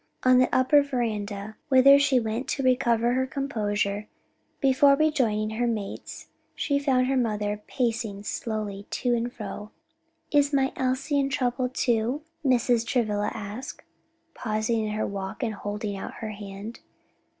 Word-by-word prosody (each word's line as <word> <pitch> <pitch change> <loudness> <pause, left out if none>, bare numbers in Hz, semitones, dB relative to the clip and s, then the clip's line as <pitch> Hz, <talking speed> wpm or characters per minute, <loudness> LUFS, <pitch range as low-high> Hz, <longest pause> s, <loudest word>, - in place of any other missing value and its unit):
On 255 0 +6
the 255 - +4
upper 260 +3 +5
veranda, 215 -6 -3
whither 275 +1 +7
she 280 -3 +3
went 225 +3 -3
to 275 - -2
recover 240 -2 +2
her 260 +1 +1
composure, 210 -7 -2 0.5
before 275 0 +5
rejoining 250 -9 +1
her 240 +2 0
mates, 215 -4 -5 0.3
she 285 -2 0
found 265 -3 +2
her 270 +1 0
mother 210 -4 -1
pacing 225 -5 -2
slowly 210 -2 -4
to 245 -1 0
and 240 +1 -1
fro. 210 -2 -7 0.6
"Is 285 -1 +3
my 270 -1 +2
Elsie 260 +3 0
in 275 0 +1
trouble, 250 -1 0
too?" 245 +3 0 0.2
Mrs. 245 -3 +3
Travilla 215 -4 0
asked, 220 +5 -7 0.5
pausing 220 0 -1
in 210 - -3
her 215 - -1
walk 195 +4 -5
and 225 -2 -1
holding 205 0 -4
out 195 - -7
her 220 -2 -5
hand. 205 +2 -8
235 Hz, 145 wpm, -26 LUFS, 210-260 Hz, 0.6 s, whither